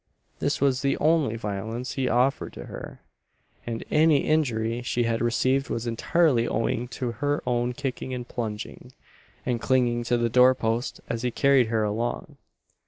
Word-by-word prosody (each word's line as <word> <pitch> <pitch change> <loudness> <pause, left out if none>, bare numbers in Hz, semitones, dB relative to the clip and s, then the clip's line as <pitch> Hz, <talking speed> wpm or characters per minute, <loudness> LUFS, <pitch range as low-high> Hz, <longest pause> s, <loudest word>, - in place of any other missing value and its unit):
This - - 0
was 135 -2 +2
the 140 -1 +1
only 155 -7 +2
violence 110 +3 -4
he 130 -2 -1
offered 125 +3 +1
to - - -8
her; - - -9 0.7
and 115 -1 -3
any 155 -2 +4
injury 120 -7 0
she 120 0 0
had 115 -1 0
received 130 +3 +1
was 115 - -3
entirely 120 +1 +2
owing 115 +2 -1
to 125 -2 -2
her 145 +5 -1
own 120 0 0
kicking 130 -1 -4
and 125 -1 -5
plunging, 115 +2 -6 0.5
and 120 -2 -1
clinging 120 -2 +2
to 120 0 +2
the 120 0 +1
door 125 +2 +5
posts 115 +2 -2
as 115 -1 -3
he 125 - 0
carried 135 -1 +3
her 110 -1 0
along. 110 +3 -3
120 Hz, 165 wpm, -26 LUFS, 115-135 Hz, 0.7 s, door